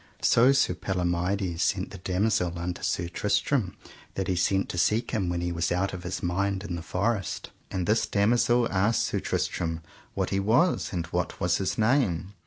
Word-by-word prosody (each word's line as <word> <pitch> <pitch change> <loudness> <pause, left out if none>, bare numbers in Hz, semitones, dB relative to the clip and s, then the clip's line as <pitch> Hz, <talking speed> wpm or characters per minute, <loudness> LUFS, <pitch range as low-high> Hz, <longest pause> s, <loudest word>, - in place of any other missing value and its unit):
So 125 +3 +5
Sir 135 -9 +3
Palomides 90 0 -1
sent 95 -2 0
the 100 - -9
damosel 90 -2 0
unto 90 +1 -4
Sir 90 -1 -1
Tristram 105 +3 0 0.4
that 95 -1 -2
he 95 - +1
sent 95 +2 +1
to 90 - -3
seek 110 +6 +1
him 100 -6 0
when 85 0 -1
he 90 0 -1
was 85 0 -1
out 95 +2 0
of 90 - -5
his 90 - -5
mind 95 +2 0
in 100 - -5
the 85 - -5
forest, 100 +3 -2 0.2
and 90 -2 -2
this 110 +4 +2
damosel 120 +3 +3
asked 100 +4 +2
Sir - - -1
Tristram 80 -1 -2 0.3
what - - -1
he 95 - +1
was 120 - +2
and 85 -3 -2
what - - -2
was 90 -1 +2
his 95 - -2
name? 105 - +1
95 Hz, 190 wpm, -27 LUFS, 90-105 Hz, 0.4 s, So